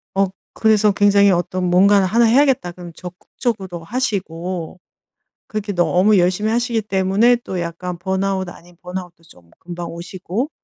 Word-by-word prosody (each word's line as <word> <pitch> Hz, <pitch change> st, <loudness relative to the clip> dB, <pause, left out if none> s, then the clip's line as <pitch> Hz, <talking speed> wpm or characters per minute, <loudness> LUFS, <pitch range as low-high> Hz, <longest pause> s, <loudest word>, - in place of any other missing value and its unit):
어 195 Hz, 0 st, +3 dB, 0.3 s
그래서 215 Hz, -1 st, +3 dB
굉장히 200 Hz, 0 st, +4 dB
어떤 180 Hz, +1 st, -1 dB
무언가는 190 Hz, +2 st, +4 dB
하나 230 Hz, +5 st, +3 dB
해야겠다 250 Hz, -6 st, +3 dB
그러면 175 Hz, -1 st, -11 dB
적극적으로 180 Hz, 0 st, -5 dB
하시고, 185 Hz, -6 st, -3 dB, 0.7 s
그렇게 215 Hz, -1 st, -4 dB
너무 185 Hz, +3 st, +3 dB
열심히 185 Hz, +4 st, +1 dB
하시기 235 Hz, -1 st, 0 dB
때문에 200 Hz, +4 st, +2 dB
또 185 Hz, -2 st, -4 dB
약간 170 Hz, +1 st, -5 dB
번아웃 190 Hz, +1 st, -1 dB
아닌 175 Hz, 0 st, -14 dB
번아웃도 180 Hz, -2 st, -7 dB
좀 85 Hz, -, -20 dB
금방 175 Hz, 0 st, -7 dB
오시고 185 Hz, -, -4 dB
190 Hz, 350 characters per minute, -19 LUFS, 175-210 Hz, 0.7 s, 굉장히